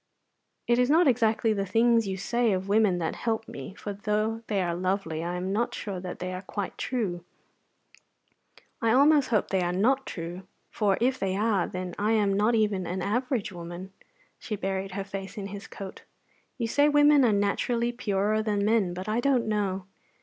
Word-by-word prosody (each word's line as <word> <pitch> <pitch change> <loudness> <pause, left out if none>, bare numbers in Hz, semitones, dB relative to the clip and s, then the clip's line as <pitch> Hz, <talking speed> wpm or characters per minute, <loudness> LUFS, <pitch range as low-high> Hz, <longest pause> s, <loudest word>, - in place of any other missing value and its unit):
"It 240 0 +2
is 250 +1 +3
not 325 +2 +5
exactly 225 -3 +2
the 200 -1 -1
things 230 +2 +3
you 190 -1 -3
say 235 +2 +1
of 190 +1 -2
women 205 -3 +3
that 165 -2 -2
help 225 -1 -2
me, 140 +8 -8
for 205 - -5
though 215 +2 -1
they 205 -2 0
are 175 -2 0
lovely 180 -3 -2
I 175 +1 -3
am 185 +2 -2
not 235 +3 0
sure 195 -3 -5
that 180 -1 -6
they 185 0 -4
are 185 - -5
quite 200 0 -5
true. 195 -9 -2 1.6
I 225 -1 +3
almost 285 +2 +5
hope 215 -3 +1
they 190 -1 +1
are 175 0 0
not 255 +9 +1
true; 175 +2 -6 0.2
for 200 -3 +1
if 255 +2 +1
they 190 -1 -1
are, 205 -4 +1
then 180 -1 -5
I 210 +2 +2
am 205 -3 +2
not 210 +4 +2
even 205 -5 +1
an 180 +1 -3
average 245 +1 -1
woman." 175 +2 -8 0.5
She 215 - -4
buried 195 -1 -3
her 195 - -3
face 195 +1 -7
in 200 - -4
his 200 0 -8
coat. 195 -1 -9 0.6
"You 235 - -1
say 285 +6 +3
women 290 -1 +5
are 235 - +4
naturally 230 +4 +1
purer 215 -2 0
than 205 -2 0
men, 210 -5 +2
but 185 +2 -6
I 215 +2 0
don't 255 -1 +2
know. 195 -3 -1
205 Hz, 195 wpm, -27 LUFS, 190-230 Hz, 1.6 s, not